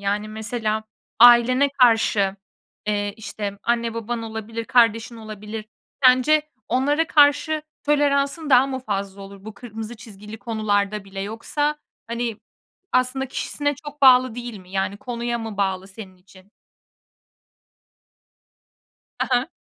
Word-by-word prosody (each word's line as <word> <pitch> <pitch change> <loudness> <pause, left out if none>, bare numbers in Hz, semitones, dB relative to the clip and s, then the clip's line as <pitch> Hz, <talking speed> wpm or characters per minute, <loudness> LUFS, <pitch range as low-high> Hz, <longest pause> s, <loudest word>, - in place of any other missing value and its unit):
Yani, 205 +1 -1
mesela 220 0 -3 0.3
ailene 245 +3 +7
karşı, 225 -7 +3 0.5
eee, 205 -1 -1
işte, 205 -2 -6
anne 235 -1 0
baban 230 +1 -4
olabilir, 225 0 -5
kardeşin 230 -1 +2
olabilir. 215 0 -8 0.4
Sence 255 +4 +5 0.3
onlara 290 +6 +1
karşı 300 +1 +3 0.2
toleransın 285 +1 +1
daha 260 0 +6
mı 265 -1 -3
fazla 200 -4 -4
olur? 195 0 -12
Bu 220 0 -8
kırmızı 225 0 -8
çizgili 210 -1 -11
konularda 210 -3 -1
bile 195 0 -8
yoksa, 290 +9 -2 0.3
hani, 235 -1 -3 0.5
aslında 255 +1 +1
kişisine 290 +2 -2
çok 290 +1 -11
bağlı 255 -2 +6
değil 240 -2 -6
mi, 185 -1 -16
yani, 190 +1 -2
konuya 235 +1 -3
mı 225 -2 -6
bağlı 190 -1 -1
senin 195 -2 -11
için? 185 +1 -20 2.7
Ha - - 0
ha. 250 +3 +2
230 Hz, 120 wpm, -22 LUFS, 205-255 Hz, 2.7 s, ailene